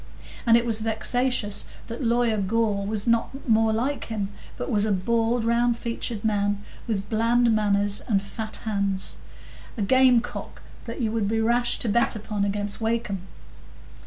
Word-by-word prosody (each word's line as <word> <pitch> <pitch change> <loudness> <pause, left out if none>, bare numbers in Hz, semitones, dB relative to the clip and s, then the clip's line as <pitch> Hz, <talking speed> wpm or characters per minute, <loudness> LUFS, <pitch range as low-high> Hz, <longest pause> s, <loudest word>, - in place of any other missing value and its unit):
And 230 0 +7
it 235 - 0
was 225 -2 +3
vexatious 225 0 0 0.2
that 230 +3 -6
Lawyer 235 -1 +2
Gore 200 0 0
was 210 -1 -1
not 235 +4 0
more 225 -1 +4
like 250 +6 -1
him, 210 -3 -3 0.3
but - - -4
was 205 -3 +3
a 215 - +1
bald, 230 +4 +1
round 235 0 +2
featured 230 -2 -4
man, 205 -1 +1 0.3
with 205 -3 -2
bland 230 +1 +3
manners 205 -1 +1
and 205 -4 +3
fat 215 +2 -6
hands; 200 -3 -2 0.6
a 210 - 0
game 255 +2 +5
cock 245 - -8 0.2
that 230 +2 -6
you 220 -2 0
would 220 -3 0
be 225 +2 0
rash 240 +2 +2
to - - -3
bet 235 +2 +2
upon 210 -1 -3
against 205 +1 -1
Wakem. 225 -3 -1
225 Hz, 160 wpm, -25 LUFS, 205-235 Hz, 0.6 s, And